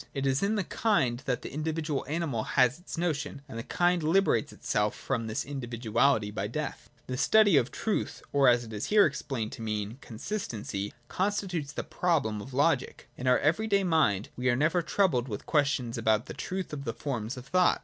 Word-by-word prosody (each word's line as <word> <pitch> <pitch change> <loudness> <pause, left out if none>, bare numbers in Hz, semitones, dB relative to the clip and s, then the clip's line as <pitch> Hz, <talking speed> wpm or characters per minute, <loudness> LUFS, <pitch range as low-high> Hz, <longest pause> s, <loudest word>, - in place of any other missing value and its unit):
It 135 0 -1
is 135 0 +2
in 205 +2 +1
the 205 - 0
kind 135 - +1
that 125 -2 -1
the - - -7
individual 155 -1 -2
animal 150 -6 -1
has 130 +3 +2
its 175 - -8
notion: 150 -4 -2
and 115 -4 -7
the - - -4
kind 175 +4 +1
liberates 160 -2 +2
itself 105 0 -1
from 115 -4 -2
this 110 - -2
individuality 120 -3 0
by 105 - -3
death. - - -5 0.2
The 130 - -4
study 205 +7 +5
of 130 -2 +3
truth, 220 - -2
or, 140 -2 +5
as 120 -1 +5
it 110 -1 -9
is 105 - -3
here 210 -1 +6
explained 135 -6 -3
to 130 - -8
mean, 105 +2 -3
consistency, 110 - -4 0.2
constitutes 185 -6 -1
the - - -4
proper - - -21
problem 145 - +1
of 130 - -9
logic. 140 0 0
In 130 - -5
our 125 - +6
every 165 +10 +1
day 200 -2 +3
mind 155 - +2
we 125 +1 0
are 120 - +3
never 155 +7 +2
troubled 165 -8 +1
with 105 -4 -5
questions 140 -6 +1
about 110 0 +2
the - - -7
truth 185 -3 -4
of 140 -2 -4
the 115 -4 -3
forms 120 -3 -3
of 125 - -8
thought. 180 +5 +3
140 Hz, 200 wpm, -29 LUFS, 120-170 Hz, 0.2 s, here